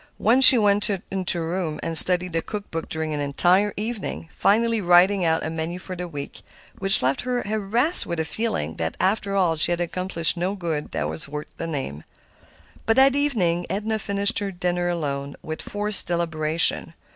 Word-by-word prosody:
Once 250 +4 +5
she 255 - +10
went 205 -2 +2
to 200 -2 +1 0.4
her 165 -1 -4
room 170 -3 -4
and 165 0 -4
studied 180 +1 +5
the 165 - -1
cookbook 200 -6 -7
during 160 -1 -4
an 150 - -4
entire 175 +8 +1
evening, 215 -5 -5
finally 230 +2 +1
writing 180 +2 +3
out 160 -1 0
a - - -3
menu 165 +2 -5
for 185 0 -7
the 180 0 -6
week, 145 -4 -9 0.4
which 195 -6 +5
left 130 +2 0
her 250 -1 -3
harassed 220 - +4
with 170 -1 -4
a 160 - -2
feeling 155 - -4
that, 80 0 -4
after 200 +1 -1
all, 180 -4 +1
she 160 +2 +4
had 175 - -1
accomplished 175 -1 0
no 180 +3 -3
good 165 -6 -5
that 75 -1 -3
was 80 - -7
worth 150 +1 -8
the 165 - -5
name. 135 - -6 0.8
But 225 - +2
that 265 +1 +4
evening 190 -12 -1
Edna 215 +2 -3
finished 200 0 +1
her 200 -1 -4
dinner 175 -1 -2
alone, 140 -4 -4
with 155 0 -6
forced 205 0 -2
deliberation. 165 -1 -1
175 Hz, 185 wpm, -22 LUFS, 160-205 Hz, 0.8 s, she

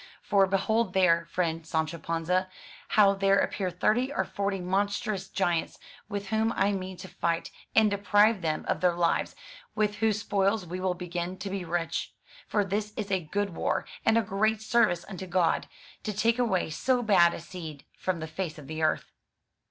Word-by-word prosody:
For 195 -1 +4
behold 195 +2 +1
there, 170 -3 +4
friend 165 -2 -1
Sancho 160 0 -2
Panza, 170 +4 -1 0.5
how 200 -2 +7
there 195 0 +3
appear 195 -2 0
thirty 220 +9 +1
or - - 0
forty 200 -1 -2
monstrous 200 +3 -1
giants, 175 -4 0 0.3
with 200 -1 -4
whom 220 +1 +1
I 200 - +2
mean 185 -1 -4
to 185 - -9
fight, 170 -1 -2 0.2
and 220 -2 +5
deprive 205 +1 +3
them 155 -2 -1
of - - 0
their 180 -1 +3
lives, 170 -1 +1 0.4
with 210 -1 0
whose 215 -1 +1
spoils 200 0 +1
we 180 +2 -5
will 185 -1 0
begin 175 0 -4
to 190 +1 -5
be 195 -1 -3
rich. 170 -1 -2 0.3
For 205 -2 +1
this 210 +2 -2
is 205 -2 -3
a 190 - +3
good 205 +5 -1
war, 165 - -1 0.2
and 225 0 +4
a 230 - +3
great 215 +2 0
service 220 -6 +2
unto 190 -2 -7
God, 175 -2 +1 0.3
to 215 - -3
take 230 +4 +2
away 190 -9 +1
so 250 +9 +1
bad 175 -6 +5
a - - -6
seed 165 -4 -9
from 180 -3 -2
the 160 - -4
face 160 0 -4
of 150 - -10
the 155 +2 -5
earth.'' 155 -1 0
190 Hz, 185 wpm, -28 LUFS, 175-210 Hz, 0.5 s, how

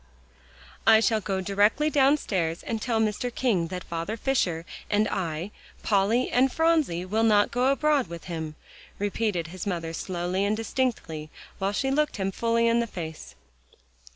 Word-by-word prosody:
"I 220 0 +8
shall 220 -1 +2
go 190 -1 -2
directly 205 +10 +2
downstairs 245 - +1
and 225 -2 -3
tell 230 -2 0
Mr. 220 +3 0
King 215 -10 +1
that 180 0 -5
Father 170 +7 -4
Fisher 180 -11 0 0.2
and 210 +1 +2
I, 170 +1 -3 0.3
Polly 215 +4 +2
and 255 +2 +3
Phronsie, 315 - +1
will 215 +4 0
not 210 -2 +4
go 250 +2 +1
abroad 290 -3 +2
with 170 -1 -8
him," 160 -3 -5 0.4
repeated 200 -4 -1
his 185 +3 -6
mother 165 -4 -3
slowly 180 +2 -2
and 210 +1 +1
distinctly 220 -10 -2 0.3
while 195 +1 0
she 270 +6 -1
looked 300 -1 +1
him 195 -1 -1
fully 230 +3 +1
in 230 0 +3
the 235 - 0
face. 160 -6 -7
205 Hz, 155 wpm, -26 LUFS, 175-235 Hz, 0.4 s, I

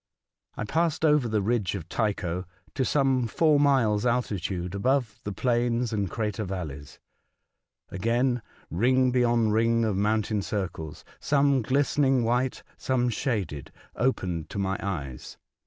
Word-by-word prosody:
I - - -2
passed 160 +6 0
over 150 -5 +4
the 105 -3 0
ridge 105 -3 0
of 85 -4 -6
Tycho 90 -4 -1 0.3
to 130 - 0
some 130 -3 +2
four 155 +4 +3
miles* 125 -7 +3
altitude 95 -7 -1
above 125 +2 0
the 105 - -4
plains 120 +1 0
and 100 -3 -1
crater 105 +2 -2
valleys. 80 -8 -6 0.9
Again 120 +5 +1 0.3
ring 130 - +3
beyond 120 -3 +2
ring 115 +1 +2
of 105 -3 0
mountain 105 +1 +1
circles 95 -7 -5
— - - -25
some 140 -2 +2
glistening 135 +1 +2
white, 125 +3 0
some 125 -2 0
shaded 100 - -3
— - - -29
opened 90 -10 -1
to - - -7
my 95 0 -1
eyes. 70 -10 -5
115 Hz, 140 wpm, -27 LUFS, 95-130 Hz, 0.9 s, over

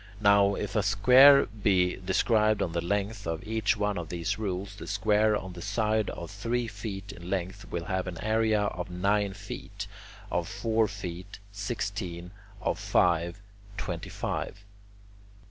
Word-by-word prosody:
Now 100 -1 +5
if 105 - -4
a 105 - +4
square 125 +8 +7
be 95 -4 +1
described 105 +3 +2
on 85 - -2
the 85 0 -1
length 100 +1 -2
of 80 +3 -3
each 110 -1 +1
one 105 -2 0
of 85 -2 -6
these 90 +4 -2
rules, 100 -1 -3
the - - -8
square 105 +1 +2
on 95 -2 -7
the 85 - -9
side 110 +3 0
of 85 +2 -7
three 115 +4 -1
feet 100 -2 -6
in 85 -2 -10
length 95 -1 -3
will 85 -1 -3
have 95 0 -2
an 90 -2 -5
area 110 -1 +2
of 90 -3 -3
nine 100 +3 +1
feet; 100 +1 -7 0.5
of 85 -1 0
four 110 +2 +1
feet, 95 -2 -7
sixteen; 100 -4 -4 0.3
of - - 0
five, 85 +1 +2 0.4
twenty 85 -5 -4
five. 100 +1 -4
100 Hz, 155 wpm, -28 LUFS, 90-105 Hz, 0.5 s, square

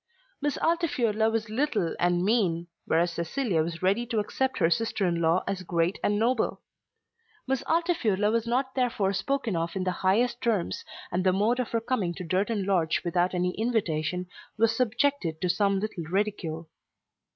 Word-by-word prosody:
Miss 290 -1 0
Altifiorla 260 -11 +1
was 225 0 -1
little 215 - 0
and 175 0 +2
mean, 190 -7 +2 0.2
whereas 170 +2 +2
Cecilia 170 - 0
was 165 +2 -4
ready 200 +6 +2
to 230 -2 -2
accept 260 +5 -1
her 165 - +3
sister 225 -1 0
in 170 -1 0
law 165 +2 +3
as 190 -1 -2
great 170 0 0
and 205 - +2
noble. 230 +2 +1 0.8
Miss 265 -1 0
Altifiorla 250 - +1
was 230 0 0
not 260 +3 0
therefore 230 -7 +1
spoken 240 0 -1
of 165 +2 -2
in 190 - -1
the 185 - 0
highest 235 +6 +2
terms, 220 -8 0 0.3
and 180 +1 0
the 185 - +4
mode 215 +6 +1
of 250 - -1
her 230 - 0
coming 205 -8 -1
to 180 - -6
Durton 195 +4 0
Lodge 175 -5 +1
without 175 +1 +1
an 180 0 +1
invitation 180 -5 -1 0.3
was 225 +1 +3
subjected 245 - 0
to 180 - -1
some 200 +1 +2
little 200 -5 -4
ridicule. 170 -4 -2
205 Hz, 170 wpm, -27 LUFS, 175-235 Hz, 0.8 s, the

